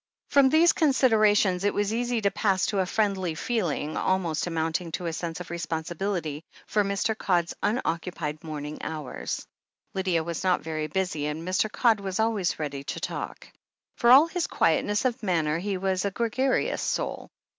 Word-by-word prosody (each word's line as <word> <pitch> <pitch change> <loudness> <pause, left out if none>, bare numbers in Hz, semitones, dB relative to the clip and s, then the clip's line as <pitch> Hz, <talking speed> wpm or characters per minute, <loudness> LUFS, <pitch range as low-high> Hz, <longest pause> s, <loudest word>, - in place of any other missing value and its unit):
From 275 -2 +5
these 325 +4 +5
considerations 215 - +3
it 205 - +1
was 205 +1 0
easy 240 0 0
to 200 -1 +2
pass 195 -4 +1
to 205 - -1
a 185 - +1
friendly 190 -5 0
feeling, 165 - -1
almost 175 -4 0
amounting 165 +1 -2
to 180 - -3
a 165 - -2
sense 165 +1 -4
of 180 - -8
re 170 - -4
sponsibility, 165 -1 -3 0.2
for 210 0 +1
Mr. 200 +3 0
Codd's 175 -5 0
unoccupied 170 - -2
morning 150 -1 -6
hours. 150 -4 -5 0.5
Lydia 185 -4 0
was 170 +2 -4
not 185 -1 +2
very 155 -1 -3
busy, 180 -5 -1
and 155 +3 -4
Mr. 185 +3 +1
Codd 225 -3 +3
was 195 0 -4
always 220 -5 +1
ready 140 -3 -4
to - - -4
talk. - - -5 0.5
For 235 - +2
all 270 +5 +9
his 335 +1 -2
quietness 205 +8 +1
of 255 0 0
manner, 165 -6 +1
he 195 +1 -2
was 190 0 0
a 200 - +1
gregarious 235 +6 0
soul. - - -2
185 Hz, 170 wpm, -27 LUFS, 165-215 Hz, 0.5 s, all